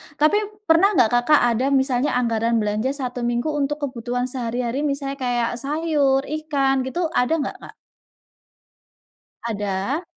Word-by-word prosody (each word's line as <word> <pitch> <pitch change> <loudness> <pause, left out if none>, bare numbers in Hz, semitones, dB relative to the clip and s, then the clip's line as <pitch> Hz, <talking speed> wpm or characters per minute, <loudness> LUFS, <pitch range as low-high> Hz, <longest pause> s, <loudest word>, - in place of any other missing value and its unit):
Tapi 305 +7 +3 0.3
pernah 330 +1 +5
nggak 230 -8 +4
Kakak 245 +5 +4
ada 235 +3 0
misalnya 265 +1 0
anggaran 230 -1 +1
belanja 210 +4 -1
1 250 -3 -4
minggu 240 +4 -1
untuk 295 0 -2
kebutuhan 245 -1 -3
sehari-hari 245 +1 -2
misalnya 275 0 -4
kayak 245 -2 0
sayur, 285 -2 +1
ikan 290 -3 0
gitu 335 +3 -2
ada 250 +5 +1
nggak, - - -4
Kak? - - -12 1.7
Ada. 210 - -2
260 Hz, 130 wpm, -22 LUFS, 240-295 Hz, 1.7 s, pernah